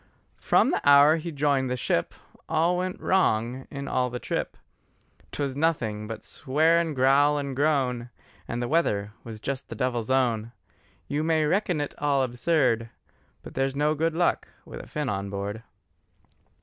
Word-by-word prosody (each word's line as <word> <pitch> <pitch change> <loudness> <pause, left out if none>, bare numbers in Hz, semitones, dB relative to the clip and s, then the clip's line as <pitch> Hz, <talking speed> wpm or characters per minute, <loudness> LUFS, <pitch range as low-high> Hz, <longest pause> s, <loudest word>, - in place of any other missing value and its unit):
From - - +3
the - - 0
hour 145 +2 +7
he 165 +1 -5
joined 140 -3 +1
the 125 - -1
ship, 85 -8 -1 0.3
All 165 +3 +2
went 185 +1 -3
wrong 125 -8 +1
in 140 0 -6
all 125 -1 0
the 125 - -4
trip; - - -3 0.7
'Twas 140 -2 -3
nothing 120 -9 -1
but 115 0 -7
swear 155 +5 +2
and 165 -3 -2
growl 140 +3 +4
and 140 -2 -3
groan, 130 -5 0 0.4
And 120 +1 -3
the - - -2
weather 105 -10 0
was 110 -2 -8
just 130 +3 -5
the - - -6
devil's 120 -3 -2
own: 120 -4 +1 0.5
You 150 +2 -1
may 160 -1 +2
reckon 180 0 +1
it 145 - -3
all 140 -2 +2
absurd, 125 -2 +1 0.5
But - - -10
there's 135 0 -1
no 150 +2 +2
good 160 +1 -1
luck 175 +1 +1 0.2
with - - -9
a - - -10
Finn 150 -2 -3
on 100 -3 -2
board. 100 +2 -4
140 Hz, 165 wpm, -26 LUFS, 120-155 Hz, 0.7 s, hour